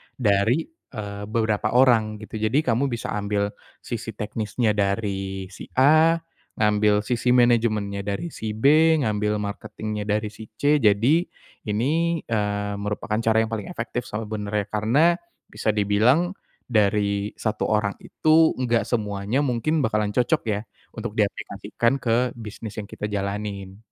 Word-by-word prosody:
dari, 110 +5 +2 0.2
eee, 105 -3 -6
beberapa 110 0 0
orang 110 -4 +3
gitu. 110 +1 -7
Jadi 110 +8 +2
kamu 125 +3 +2
bisa 120 -3 -4
ambil 100 0 -1 0.3
sisi - - -5
teknisnya 110 +1 -1
dari 95 -2 -2
si 95 - -10
A, 155 +5 +6 0.4
ngambil 105 -1 +2
sisi 125 +2 +1
manajemennya 110 -5 +2
dari 105 +12 -3
si 110 -5 -5
B, 155 +7 +5
ngambil 105 -3 0
marketing-nya 105 +1 -5
dari 105 0 0
si 110 +1 -10
C. 145 +5 +3
Jadi 120 - +3 0.4
ini, 155 +10 +1
eee, 105 -2 -1
merupakan 105 +1 -2
cara 110 -1 +2
yang 110 - -4
paling 105 -3 -3
efektif 120 +2 -4
sebenarnya. 105 -1 -3
Karena 130 +12 +3 0.3
bisa 110 0 -1
dibilang 110 - +3 0.3
dari 105 -2 +1
1 110 0 -1
orang 105 -2 +1
itu 160 +1 +3
enggak 120 -2 +1
semuanya 105 +2 -1
mungkin 140 +5 0
bakalan 105 -1 0
cocok 150 +6 +2
ya 105 0 0 0.4
untuk - - -4
diaplikasikan 125 +4 -1
ke 120 +1 +1
bisnis 110 -1 -8
yang 100 - -10
kita - - -5
jalanin. 100 -1 -4
110 Hz, 135 wpm, -24 LUFS, 105-125 Hz, 0.4 s, A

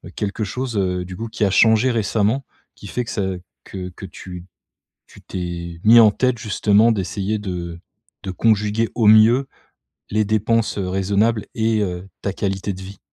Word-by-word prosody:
quelque 105 +1 -3
chose, 120 +2 -4
heu, 90 -2 -1
du 90 0 -8
coup 115 +1 -5
qui 110 - -1
a 95 - +1
changé 110 +5 +4
récemment 110 +3 0 0.3
qui 100 - -11
fait 125 +4 -3
que - - -6
ça 100 - -2 0.4
que 90 -2 -7
que 95 +2 -10
tu 90 -1 -10 0.6
tu - - -16
t'es 85 -2 -6
mis 115 +2 +8
en 110 -2 +7
tête 125 +2 0
justement 105 +1 +3
d'essayer 100 +2 -2
de 85 -4 -5 0.4
de 95 - -5
conjuguer 110 +2 +1
au 110 -3 +2
mieux 115 +5 +6 0.6
les 110 0 +1
dépenses, 110 +1 0
heu, 95 -2 -2
raisonnables 100 +3 0
et 110 -1 +1
heu, 90 0 -4
ta 100 - -2
qualité 95 0 -2
de 95 - -10
vie? 95 +1 -10
105 Hz, 175 wpm, -20 LUFS, 95-110 Hz, 0.6 s, mis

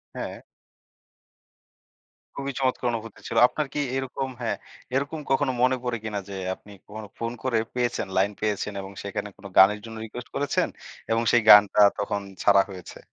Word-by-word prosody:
হ্যাঁ। - - -5 2.0
খুবই 140 0 -3
চমৎকার 130 -1 0
অনুভূতি 115 -2 -6
ছিল। 115 - -3
আপনার 150 +2 -3
কি 150 - -2 0.2
এরকম 135 0 -3
হ্যাঁ, 110 -4 -1 0.4
এরকম 145 +3 -1
কখনো 135 0 +2
মনে 130 +1 +4
পড়ে 120 -1 -1
কিনা 105 -2 -3
যে, 100 - -6 0.2
আপনি 105 - -17 0.2
কখনো 105 0 -8
ফোন 115 0 -3
করে 125 -3 +1 0.2
পেয়েছেন, 120 -5 -1
লাইন 100 +2 +3
পেয়েছেন 105 -1 -1
এবং 95 - -9
সেখানে 100 +1 -4
কোন - - -17
গানের 105 +2 +7
জন্য 115 0 -8
রিকোয়েস্ট 120 +3 -9
করেছেন 145 - +1 0.4
এবং 115 +1 +3
সেই 120 - +5
গানটা, 105 0 +8 0.2
তখন 100 0 -1 0.2
ছাড়া 100 -1 +6
হয়েছে? 95 -2 -10
115 Hz, 160 wpm, -25 LUFS, 105-130 Hz, 2.0 s, গানটা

